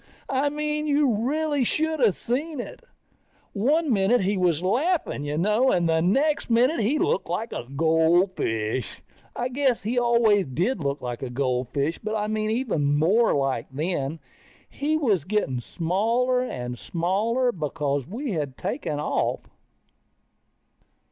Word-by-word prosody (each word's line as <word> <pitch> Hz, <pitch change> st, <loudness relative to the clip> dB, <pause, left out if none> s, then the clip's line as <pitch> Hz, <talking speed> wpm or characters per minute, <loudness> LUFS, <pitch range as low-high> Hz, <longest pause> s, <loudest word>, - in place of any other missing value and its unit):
I 275 Hz, +2 st, +1 dB
mean 300 Hz, +1 st, -2 dB
you 285 Hz, -4 st, +3 dB
really 290 Hz, +5 st, 0 dB
should 315 Hz, +2 st, 0 dB
of 210 Hz, -6 st, +4 dB
seen 285 Hz, +5 st, -3 dB
it. 245 Hz, -, -7 dB, 0.7 s
One 280 Hz, +7 st, +2 dB
minute 200 Hz, +4 st, +3 dB
he 195 Hz, +2 st, +1 dB
was 175 Hz, -3 st, +1 dB
laughing 280 Hz, -, 0 dB
you 145 Hz, +1 st, -2 dB
know, 215 Hz, +9 st, +3 dB
and 175 Hz, -2 st, +2 dB
the 160 Hz, 0 st, +2 dB
next 275 Hz, -, +1 dB
minute 245 Hz, +7 st, +3 dB
he 230 Hz, +8 st, +1 dB
looked 190 Hz, -, 0 dB
like 215 Hz, +7 st, -3 dB
a -, -, -5 dB
goldfish. 160 Hz, -, +1 dB, 0.4 s
I 245 Hz, -, -1 dB
guess 260 Hz, -3 st, 0 dB
he 240 Hz, +4 st, 0 dB
always 235 Hz, -5 st, +3 dB
did 175 Hz, -, -1 dB
look 140 Hz, 0 st, -2 dB
like 120 Hz, -1 st, -4 dB
a 130 Hz, -, -4 dB
goldfish, 130 Hz, +4 st, -1 dB
but 215 Hz, +1 st, -3 dB
I 210 Hz, -1 st, -1 dB
mean 215 Hz, 0 st, -1 dB
even 180 Hz, -, 0 dB
more 205 Hz, +10 st, +3 dB
like, 135 Hz, -4 st, -1 dB
then. 155 Hz, +4 st, -2 dB
And 150 Hz, +5 st, -5 dB, 0.5 s
he 305 Hz, +2 st, -1 dB
was 215 Hz, -, +1 dB
getting 175 Hz, -10 st, -1 dB
smaller 225 Hz, -, 0 dB
and 125 Hz, -, -5 dB
smaller, 215 Hz, +9 st, 0 dB
because 145 Hz, -, -2 dB
we 240 Hz, -, -4 dB
had 145 Hz, -7 st, -3 dB
taken 150 Hz, -1 st, -3 dB
off. 150 Hz, -, -1 dB
205 Hz, 150 wpm, -25 LUFS, 155-255 Hz, 0.7 s, of